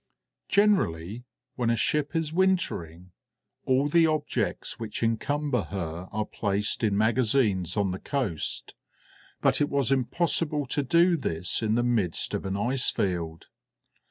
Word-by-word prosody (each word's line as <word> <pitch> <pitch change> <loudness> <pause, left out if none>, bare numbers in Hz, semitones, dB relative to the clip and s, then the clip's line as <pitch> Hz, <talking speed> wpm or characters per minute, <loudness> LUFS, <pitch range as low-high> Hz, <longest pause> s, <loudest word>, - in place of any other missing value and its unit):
Generally, 120 - +1 0.3
when 120 -2 0
a 115 - +3
ship 150 +4 0
is 160 -1 -1
wintering, 90 - 0 0.5
all 130 +2 +2
the 165 +2 +4
objects 155 -1 -2
which 115 0 -4
encumber 140 +4 0
her 85 -2 -5
are 110 0 -2
placed 105 +2 -1
in 105 -3 +2
magazines 110 -4 +2
on 100 -2 +1
the 95 - -5
coast, 120 - -2 0.7
but - - +2
it 145 - +2
was 140 -2 +1
impossible 150 +2 +1
to 145 - -1
do 170 +5 +4
this 90 - -1
in 110 0 +1
the 120 - +2
midst 110 -9 0
of - - -2
an 95 +1 -2
ice 125 +5 +2
field. 85 -4 -3
120 Hz, 140 wpm, -27 LUFS, 95-145 Hz, 0.7 s, the